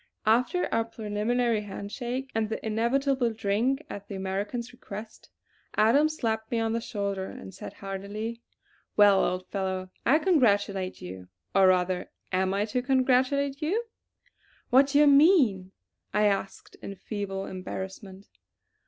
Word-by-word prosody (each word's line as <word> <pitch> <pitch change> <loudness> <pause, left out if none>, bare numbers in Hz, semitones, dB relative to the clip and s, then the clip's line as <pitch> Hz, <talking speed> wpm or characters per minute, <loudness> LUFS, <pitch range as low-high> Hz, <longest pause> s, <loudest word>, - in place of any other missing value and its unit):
After 250 - +3
our 230 - +2
preliminary 225 +1 -1
handshaking, 240 +6 -5
and 220 -1 0
the 220 - -4
inevitable 240 +3 +1
drink 225 +7 0
at 200 0 -8
the 200 - -6
American's 200 +6 -3
request, 215 -2 -10 0.5
Adams 285 +9 +3
slapped 220 -2 -2
me 235 - -1
on 225 0 0
the 230 - -1
shoulder 200 -4 -3
and 190 - -10
said 190 - -8
heartily: 205 +4 -5 0.6
"Well, 205 -2 +6
old 185 0 -1
fellow, 190 -1 -3
I 275 +6 +5
congratulate 205 - +1
you; 90 0 -8 0.3
or 195 -1 +6
rather 180 0 +1 0.2
am 185 0 +1
I 200 +2 +1
to 235 +4 -1
congratulate 265 +2 +2
you?" 385 +10 0 0.9
"What 265 +2 +6
do 285 +1 +1
you 295 - +7
mean?" 280 - +5 0.4
I 210 0 +4
asked 195 -1 -2
in 200 - -7
feeble 195 0 -4
embarrassment. 190 +1 -7
215 Hz, 135 wpm, -27 LUFS, 195-250 Hz, 0.9 s, you